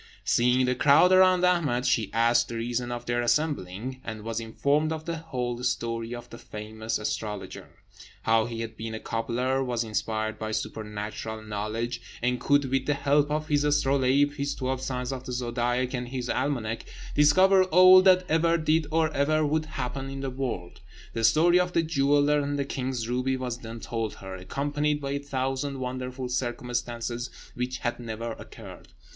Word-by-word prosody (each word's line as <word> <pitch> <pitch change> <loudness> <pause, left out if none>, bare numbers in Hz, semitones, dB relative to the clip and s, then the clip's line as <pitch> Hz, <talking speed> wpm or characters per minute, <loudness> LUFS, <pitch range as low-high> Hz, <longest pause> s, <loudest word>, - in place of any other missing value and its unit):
Seeing 125 +2 +3
the 125 - +2
crowd 145 +7 +5
around 185 -1 +6
Ahmed, 150 -9 +2
she 110 -6 +1
asked 115 +1 +3
the 115 - -6
reason 120 +1 -2
of 120 0 -5
their 120 0 0
assembling, 125 - -1
and 110 -2 -6
was 115 0 -3
informed 140 +7 0
of 160 -1 -4
the 170 -1 -3
whole 125 -7 -4
story 115 -1 -2
of 120 - -9
the 115 - -9
famous 110 +1 -5
astrologer: 105 -1 -5 0.5
how 110 0 +3
he 115 -1 -5
had 115 -1 -6
been 110 0 -5
a - - -5
cobbler, 125 +5 -1
was 120 -2 -1
inspired 110 0 -2
with 110 0 -2
supernatural 110 0 -5
knowledge, 110 +3 -3 0.2
and 125 +1 0
could, 145 0 +3
with 135 -1 0
the 145 - +2
help 145 +1 +2
of 155 +1 -1
his 145 -1 +2
astrolabe, 140 -1 +3
his 140 0 -2
twelve 130 0 -2
signs 125 0 -3
of 130 -1 -6
the - - -4
zodiac, 125 +1 -1
and 125 -1 -3
his 125 -1 -3
almanac, 115 -6 -1 0.3
discover 185 +6 +5
all 185 +1 +8
that 185 -1 +5
ever 165 +1 +3
did 155 -1 +1
or 160 0 +1
ever 155 +2 +2
would 155 +1 0
happen 135 -2 -4
in 135 0 -6
the 135 -1 -3
world. 125 -10 -5 0.3
The 115 - -2
story 165 +10 +5
of 180 0 0
the 170 - +3
jeweller 145 -1 +3
and 145 0 -2
the 140 - -1
king's 130 -4 -3
ruby 125 +2 0
was 125 -2 -4
then 115 -1 -8
told 115 -1 -3
her, 95 0 -9
accompanied 145 +10 -1
by 140 -1 -4
a 140 - -1
thousand 135 0 -2
wonderful 130 0 -4
circumstances 120 -1 -3 0.2
which 125 +1 -3
had 120 -1 -3
never 115 0 -5
occurred. - - -11
125 Hz, 175 wpm, -27 LUFS, 115-145 Hz, 0.5 s, all